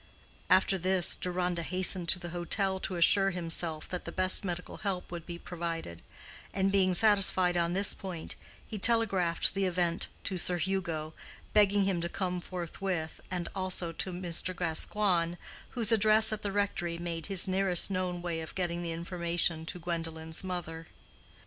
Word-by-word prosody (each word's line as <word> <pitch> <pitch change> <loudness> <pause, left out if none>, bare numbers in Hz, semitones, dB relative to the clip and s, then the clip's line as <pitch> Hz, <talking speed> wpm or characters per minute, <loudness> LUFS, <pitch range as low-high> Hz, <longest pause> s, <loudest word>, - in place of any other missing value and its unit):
After 190 +1 +3
this, 185 0 +3
Deronda 180 -1 -2
hastened 185 0 +2
to - - +4
the 175 -1 -8
hotel 190 +3 -1
to 185 - -4
assure 195 +3 +4
himself 165 -3 -2
that 180 - -5
the 170 - -7
best 185 +3 +4
medical 180 -2 -5
help 190 -4 -4
would 170 -1 -7
be 170 -1 -6
provided; 165 - -6 0.5
and 195 0 +1
being 185 -2 +2
satisfied 190 -3 +5
on 170 0 0
this 195 +2 +1
point, 180 -4 -7 0.3
he 215 - -7
telegraphed 195 -6 +3
the 195 0 0
event 175 -2 0 0.2
to 185 -2 -3
Sir 180 0 0
Hugo, 170 -4 -3 0.4
begging 205 -1 +4
him 190 -3 -1
to 170 - -3
come 180 -1 -3
forthwith, 175 -2 -5
and 180 -2 -3
also 185 -3 -2
to 185 +3 -2
Mr. 180 0 -1
Gascoigne, 175 +1 +1 0.4
whose 235 -1 +3
address 220 0 +5
at 215 - -4
the 205 - -3
rectory 195 -4 -2
made 170 -2 -5
his 195 -1 +4
nearest 190 -1 +2
known 180 -2 -3
way 170 -2 -3
of 160 -1 -8
getting 175 -2 -2
the 170 -1 -3
information 170 -1 0
to - - -5
Gwendolen's 165 -1 -5
mother. 165 -3 -6
180 Hz, 160 wpm, -30 LUFS, 170-190 Hz, 0.5 s, satisfied